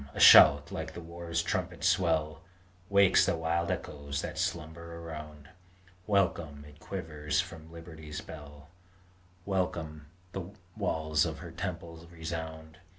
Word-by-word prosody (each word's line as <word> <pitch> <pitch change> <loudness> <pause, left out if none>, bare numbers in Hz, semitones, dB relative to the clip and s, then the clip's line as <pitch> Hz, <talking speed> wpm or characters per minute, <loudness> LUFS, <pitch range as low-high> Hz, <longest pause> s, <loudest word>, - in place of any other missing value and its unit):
a - - -4
shout - - +9
like - - -5
the - - -5
war 85 0 -9
trumpet's 85 +1 -1
swell 80 -4 +1 0.5
Wakes 100 -1 +6
the - - +1
wild 85 +1 0
echoes 70 -5 -4
that - - -5
slumber 85 +1 -3
around! 75 -3 -8 0.6
Welcome! 85 -8 0
it 75 0 -16
quivers 80 -4 -3
from 80 -3 -5
Liberty's 80 -2 -8
bell; 75 -1 -11 0.8
Welcome! 85 -6 -2 0.2
the 95 -2 -5 0.3
walls 80 -7 +1
of 80 -2 -2
her 85 0 -9
temple 85 -1 -6
resound! 80 0 -6
80 Hz, 125 wpm, -30 LUFS, 75-85 Hz, 0.8 s, shout